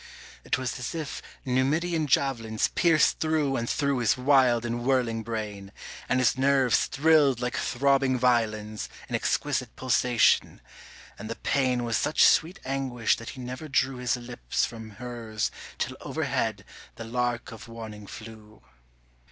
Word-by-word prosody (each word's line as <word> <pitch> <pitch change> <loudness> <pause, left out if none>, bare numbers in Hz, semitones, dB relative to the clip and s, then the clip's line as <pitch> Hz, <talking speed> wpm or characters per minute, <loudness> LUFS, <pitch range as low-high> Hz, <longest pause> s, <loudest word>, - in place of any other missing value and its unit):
It - - 0
was 130 -1 -4
as 125 +5 -4
if 155 -3 -5 0.2
Numidian 150 +6 +1
javelins 120 -5 +1
Pierced 165 -4 +3
through 155 -4 +1
and 120 -2 -2
through 140 -3 0
his 115 0 +2
wild 125 -3 +3
and 120 0 -3
whirling 120 -3 +1
brain, 105 -3 -5 0.4
And 130 - +2
his 130 -2 +3
nerves 135 -2 +3
thrilled 145 -4 +3
like 125 0 -2
throbbing 135 0 +2
violins 110 -4 0 0.2
In - - -7
exquisite - - -1
pulsation, 125 -1 +2 0.6
and 110 +2 -7
the 115 - -3
pain 130 -3 0
Was 115 -2 0
such - - +3
sweet 170 +4 +3
anguish 130 -3 0
that 115 - -8
he - - -7
never 130 +5 -6
drew 135 -2 +1
His 125 0 0
lips 120 0 -2
from 110 -1 -8
hers 115 -4 -4 0.3
till - - -2
overhead - - -2 0.3
the 115 - -7
lark 120 +1 -2
of 110 -3 -10
warning 110 -3 -9
flew. 110 -1 -12
125 Hz, 145 wpm, -27 LUFS, 115-135 Hz, 0.6 s, Pierced